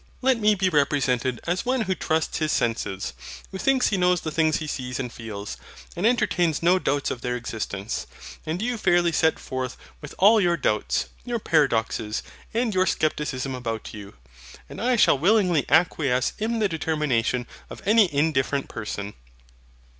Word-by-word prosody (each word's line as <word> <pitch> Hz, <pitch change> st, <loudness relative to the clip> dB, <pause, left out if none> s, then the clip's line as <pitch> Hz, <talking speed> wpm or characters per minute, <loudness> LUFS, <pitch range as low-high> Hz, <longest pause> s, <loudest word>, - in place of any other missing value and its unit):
Let 260 Hz, -2 st, +3 dB
me 210 Hz, -1 st, +4 dB
be 190 Hz, -1 st, +1 dB
represented 135 Hz, -6 st, +1 dB
as 175 Hz, +2 st, -1 dB
one 255 Hz, 0 st, 0 dB
who 190 Hz, -3 st, 0 dB
trusts 160 Hz, -2 st, -1 dB
his 155 Hz, -1 st, 0 dB
senses, 95 Hz, -, -1 dB, 0.4 s
who 190 Hz, -, -6 dB
thinks 265 Hz, +2 st, +2 dB
he 200 Hz, -, 0 dB
knows 180 Hz, -1 st, +2 dB
the 155 Hz, -, -4 dB
things 155 Hz, -1 st, +2 dB
he 155 Hz, -, -5 dB
sees 125 Hz, -4 st, -4 dB
and 125 Hz, -3 st, -4 dB
feels, 105 Hz, -3 st, -7 dB, 0.4 s
and 180 Hz, +6 st, +1 dB
entertains 175 Hz, -, +1 dB
no 180 Hz, +2 st, +4 dB
doubts 145 Hz, -4 st, 0 dB
of 120 Hz, -, -5 dB
their 125 Hz, 0 st, -2 dB
existence; 110 Hz, -4 st, -4 dB, 0.4 s
and 165 Hz, +6 st, -3 dB
you 240 Hz, -1 st, -2 dB
fairly 175 Hz, -3 st, +3 dB
set 160 Hz, 0 st, +2 dB
forth 130 Hz, -1 st, -5 dB, 0.2 s
with -, -, -9 dB
all 210 Hz, +3 st, +6 dB
your 175 Hz, -2 st, +2 dB
doubts, 105 Hz, -7 st, 0 dB, 0.2 s
your 240 Hz, -1 st, -2 dB
paradoxes, 115 Hz, -, 0 dB, 0.3 s
and 230 Hz, -1 st, 0 dB
your 185 Hz, 0 st, +2 dB
scepticism 145 Hz, -5 st, -1 dB
about 115 Hz, -3 st, -5 dB
you, 105 Hz, -, -10 dB, 0.5 s
and -, -, -8 dB
I 250 Hz, +2 st, +2 dB
shall 175 Hz, -, +4 dB
willingly 180 Hz, -, +3 dB
acquiesce 145 Hz, -4 st, +2 dB
in 225 Hz, +2 st, -1 dB
the 215 Hz, -2 st, +2 dB
determination 150 Hz, -, 0 dB, 0.2 s
of -, -, -10 dB
any 210 Hz, -2 st, +5 dB
indifferent 140 Hz, -2 st, 0 dB
person. 105 Hz, -2 st, -5 dB
155 Hz, 165 wpm, -24 LUFS, 125-190 Hz, 0.5 s, all